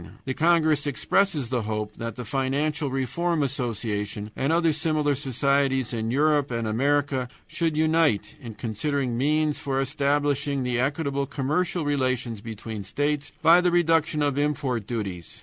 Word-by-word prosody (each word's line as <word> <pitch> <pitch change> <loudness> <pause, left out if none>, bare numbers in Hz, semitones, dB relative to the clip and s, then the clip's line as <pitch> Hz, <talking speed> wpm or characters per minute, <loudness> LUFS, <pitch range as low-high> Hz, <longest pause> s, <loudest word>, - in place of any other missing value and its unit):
The 130 - -1
congress 155 -2 +3
expresses 150 -1 +1
the 125 -2 0
hope 105 0 -3
that 115 -2 -5
the 125 - -6
Financial 140 +4 -1
Reform 145 +5 0
Association 105 -5 -3
and 135 +3 0
other 165 -1 +3
similar 155 -1 +1
societies 135 -1 +1
in 115 -1 -2
Europe 145 +2 +2
and 115 -2 -2
America 135 +2 +1 0.2
should 165 -3 -1
unite 160 -7 +2
in 115 -4 -8
considering 125 +3 -2
means 150 +4 +1
for 135 -1 -1
establishing 140 0 0
equitable 140 +3 0
commercial 150 +5 -1
relations 130 -6 -1
between 110 -1 -6
states, 145 +7 -2
by 170 +2 +7
the 180 - +3
reduction 165 -3 +2
of 145 -1 0
import 135 -7 -1
duties. 95 -8 -5
140 Hz, 140 wpm, -25 LUFS, 120-150 Hz, 0.2 s, by